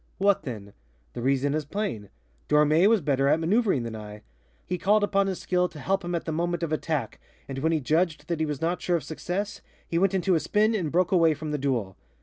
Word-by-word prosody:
What 200 0 +3
then? 105 -6 -7 0.4
The 120 - -5
reason 135 +2 +1
is 155 0 -1
plain: 145 - -4 0.4
Dormé 150 +5 +5
was 225 -3 +3
better 140 -2 +1
at 150 - +3
maneuvering 190 - +2
than 115 -1 -5
I. 105 -1 -9 0.4
He 180 0 -3
called 205 +3 +3
upon 200 -1 +2
his 190 -2 -3
skill 180 -1 +1
to 155 - -13
help 195 +6 0
him 175 0 -2
at 170 - -3
the 160 - -2
moment 170 +2 -1
of 165 - -2
attack, 155 -6 -2 0.3
and 135 -1 -5
when 160 +4 +1
he 160 - +2
judged 155 +4 0
that 170 -2 -2
he 160 - +1
was 145 -2 -4
not 170 +2 -1
sure 175 - +1
of 155 - -7
success, 190 +7 -4 0.3
he 170 - 0
went 195 +1 +2
into 190 0 +2
a 165 - +3
spin 215 +6 +2
and 175 -9 -1
broke 180 +1 +2
away 165 -4 +4
from 155 +1 -5
the 150 - -2
duel. 120 -9 -2
165 Hz, 235 wpm, -26 LUFS, 140-185 Hz, 0.4 s, Dormé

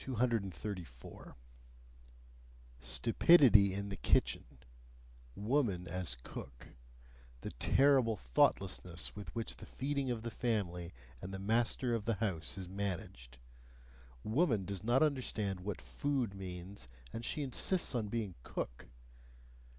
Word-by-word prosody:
234. 100 - -3 1.4
Stupidity 105 - +6
in 100 0 -3
the 95 - -4
kitchen; 65 - +2 0.9
woman 105 -5 0
as 85 -8 -2
cook; 60 -2 -9 0.7
the - - -5
terrible 130 -5 +4
thoughtlessness 90 +6 +1
with 105 0 -7
which 115 -1 -3
the - - -10
feeding 140 0 -2
of 115 -2 -2
the 115 - -4
family 95 -8 -2 0.3
and 90 - -6
the 95 - -4
master 115 +4 +1
of 110 -3 -1
the 115 - +1
house 95 -5 -2
is 95 -2 -6
managed! 90 -10 -5 0.9
Woman 110 - +2
does 100 0 -5
not 120 +6 +4
understand 110 -9 0
what 95 +1 -4
food 120 - -1
means, 95 -1 -8 0.3
and 115 - -5
she 145 +5 -1
insists 140 +8 +2
on 115 -4 -1
being 105 -3 -2
cook! - - -5
105 Hz, 120 wpm, -35 LUFS, 90-120 Hz, 1.4 s, Stupidity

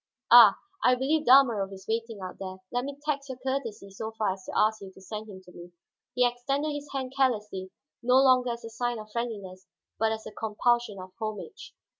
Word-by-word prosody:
Ah, 230 -5 +9 0.3
I 250 - +5
believe 295 +5 0
Dalmorov 235 -7 +5
is 190 0 -11
waiting 225 -2 -3
out 185 -1 -7
there; 190 -1 -7
let 245 +1 -1
me 280 0 -6
tax 280 -2 -2
your 260 - -5
courtesy 250 -6 -4
so 220 +3 -6
far 210 -4 +1
as 190 0 -13
to - - -5
ask 215 0 +2
you 195 -1 -9
to - - -16
send 215 +3 -7
him 190 -2 -11
to 180 - -16
me." 175 0 -12 0.4
He 250 0 +4
extended 275 +5 -2
his 290 0 -6
hand 265 -1 -4
carelessly; 210 -8 0 0.3
no 250 +1 +3
longer 255 -2 +5
as 235 0 -5
a 225 - -8
sign 240 +1 -2
of 215 0 -10
friendliness, 200 -5 -5 0.3
but 220 0 +2
as 220 0 -4
a 215 - -7
compulsion 220 0 0
of 185 0 -9
homage. 215 - -6
225 Hz, 210 wpm, -28 LUFS, 200-255 Hz, 0.4 s, Ah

